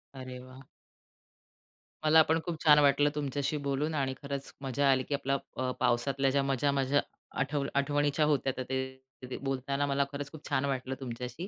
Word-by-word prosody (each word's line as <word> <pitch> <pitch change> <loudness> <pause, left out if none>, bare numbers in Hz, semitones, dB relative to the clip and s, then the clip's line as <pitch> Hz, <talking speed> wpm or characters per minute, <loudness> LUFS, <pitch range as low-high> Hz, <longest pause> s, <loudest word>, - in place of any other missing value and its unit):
अरे 130 -1 -7
वाह! 130 +1 -13 1.4
मला 160 +1 +7
पण 160 +1 +1
खूप 165 -3 -4
छान 150 -1 +7
वाटलं 145 0 +4
तुमच्याशी 145 +1 -1
बोलून 145 +3 0
आणि 135 -2 0
खरंच 140 -1 -5
मजा 135 +1 +1
आली, 130 -1 +2
की 145 - -5
आपला 140 0 0 0.2
अ, 130 0 0
पावसातल्या 135 +3 +2
ज्या 140 0 +2
मजा 135 +1 +1
माझ्या 140 +1 +2 0.4
आठ 140 +2 -1 0.2
आठवणीच्या 145 +1 +2
होत्या, 140 -3 +1
तर 130 - -2
ते 130 0 -3 0.3
ते - - -4
बोलताना 140 +1 -1
मला 140 0 +2
खरंच 145 0 -5
खूप 155 -2 -10
छान 135 - +1
वाटलं 130 -1 -2
तुमच्याशी 125 +6 -6
140 Hz, 175 wpm, -30 LUFS, 130-145 Hz, 1.4 s, मला